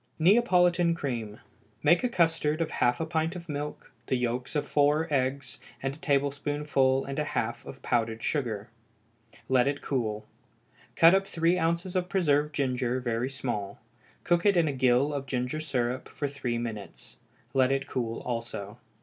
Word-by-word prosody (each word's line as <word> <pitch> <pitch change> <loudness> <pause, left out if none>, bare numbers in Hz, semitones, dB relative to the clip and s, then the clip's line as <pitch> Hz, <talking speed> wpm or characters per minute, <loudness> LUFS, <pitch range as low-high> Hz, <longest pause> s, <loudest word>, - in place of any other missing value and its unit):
Neapolitan 175 -3 +4
Cream. 115 -9 -4 0.4
Make 170 +9 +4
a 250 - +2
custard 165 -6 +1
of 165 -1 -1
half 120 0 +1
a 160 - -1
pint 160 +2 -1
of 170 -1 -8
milk, 150 -1 -5 0.2
the - - +1
yolks 125 +2 -2
of 150 - 0
four 150 +2 +3
eggs, 130 -1 -1 0.2
and 135 0 -2
a - - -15
tablespoonful 140 -2 +1
and 140 +2 -4
a - - +1
half 120 -5 -2
of 135 - -10
powdered 115 -2 0
sugar. 115 -7 -2 0.8
Let 130 0 +3
it 145 0 -2
cool. 110 -6 -2 0.7
Cut 165 +2 +7
up 195 0 +2
three 170 0 +1
ounces 170 +3 -1
of 180 0 0
preserved 150 -5 +2
ginger 130 -2 0
very 120 0 -1
small; 105 -7 -4 0.4
cook 175 0 +2
it 200 -3 +4
in 165 -2 +4
a 145 - 0
gill 130 +2 +3
of 140 -1 -4
ginger 125 +3 -2
syrup 130 -4 -2
for 145 - -3
three 135 -4 -3
minutes. 115 -1 -7 0.4
Let 130 -1 +3
it 135 0 0
cool 115 -4 -3
also. 115 -3 -5
140 Hz, 165 wpm, -28 LUFS, 125-160 Hz, 0.8 s, Cut